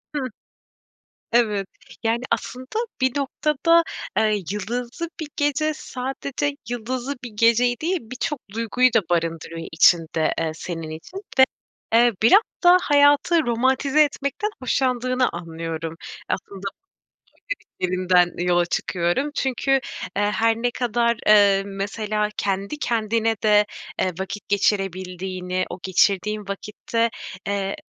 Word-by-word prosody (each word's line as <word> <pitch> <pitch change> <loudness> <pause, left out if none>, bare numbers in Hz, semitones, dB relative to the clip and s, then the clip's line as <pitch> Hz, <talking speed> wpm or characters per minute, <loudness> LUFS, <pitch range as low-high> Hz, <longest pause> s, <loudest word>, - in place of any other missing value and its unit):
Hıh. 275 -3 -1 1.0
Evet. 210 -5 +2 0.4
Yani, 230 +1 +1
aslında 255 +1 -3 0.3
bir 260 -1 +3
noktada, 300 +4 +2 0.3
eee, 215 -3 +2
yıldızlı 240 - -4
bir 315 - -4
gece 295 +1 +1
sadece 275 +2 -3
yıldızlı 245 +3 -3
bir 245 - -5
geceyi 230 +3 +3
değil, 360 +4 +1
birçok 255 +5 -4
duyguyu 230 +3 +2
da 225 - +5
barındırıyor 165 -1 -2
içinde, 160 -1 +3
eee, 165 -1 -1
senin 165 -1 -6
için 160 - -9 0.5
ve, 230 - 0
eee, 240 -1 +5
biraz 310 - +7 0.2
da 355 +1 +8
hayatı 290 +3 +4
romantize 265 +5 +3
etmekten 290 +8 -2
hoşlandığını 255 -1 +1
anlıyorum. 165 -1 -5 0.3
Aslında 195 0 -4
bu 200 - -7 1.0
söylediklerinden 180 -1 +2
yola 175 -1 +3
çıkıyorum. 175 +12 -1
Çünkü, 265 0 -1 0.5
eee, 205 - +2
her 225 +2 +2
ne 245 +1 0
kadar, 235 -1 +1
eee, 200 -2 +6
mesela 210 +2 -2
kendi 200 +7 -2
kendine 225 -3 0
de, 210 -1 +5 0.4
eee, 185 - +1
vakit 195 +2 -5
geçirebildiğini, 185 -2 -1
o - - -6
geçirdiğin 200 +2 +1
vakitte, 220 +3 -2 0.4
eee, 200 -1 -1
220 Hz, 115 wpm, -23 LUFS, 190-255 Hz, 1.0 s, da